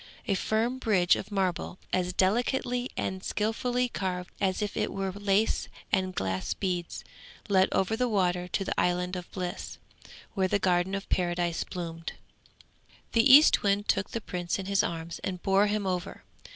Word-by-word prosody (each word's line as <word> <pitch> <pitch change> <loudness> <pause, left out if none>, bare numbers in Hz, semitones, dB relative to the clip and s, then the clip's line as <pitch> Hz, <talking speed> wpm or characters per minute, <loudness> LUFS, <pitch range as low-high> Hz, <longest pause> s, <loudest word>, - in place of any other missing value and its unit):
A 200 - +2
firm 225 +6 0
bridge 185 -7 +3
of - - -6
marble, 185 -3 -1 0.2
as 180 -1 +1
delicately 245 +6 +1
and 190 0 -3
skilfully 245 +4 0
carved 180 -5 -3
as 190 +1 +1
if 205 - -4
it - - -1
were 195 -1 -2
lace 200 +2 +1 0.2
and 185 -2 +1
glass 95 0 -2
beads, 180 -3 -3 0.5
led 190 -1 +4
over 190 +3 +1
the 250 +1 0
water 180 -4 +1
to 195 +2 -2
the - - -1
Island 180 +1 0
of 180 -1 -7
Bliss, 180 -2 -5 0.6
where 190 -2 +1
the 200 - +2
Garden 185 0 +1
of 195 - -5
Paradise 175 -1 0
bloomed. 165 -2 -6 1.0
The 230 +3 +5
Eastwind 205 -8 +6
took 195 - +1
the 230 - -4
Prince 175 -3 -3
in 195 - -5
his 200 0 +2
arms 165 0 -4
and 180 -2 -4
bore 195 +1 +4
him 205 -1 -1
over. 185 0 -3
190 Hz, 165 wpm, -28 LUFS, 180-210 Hz, 1.0 s, Eastwind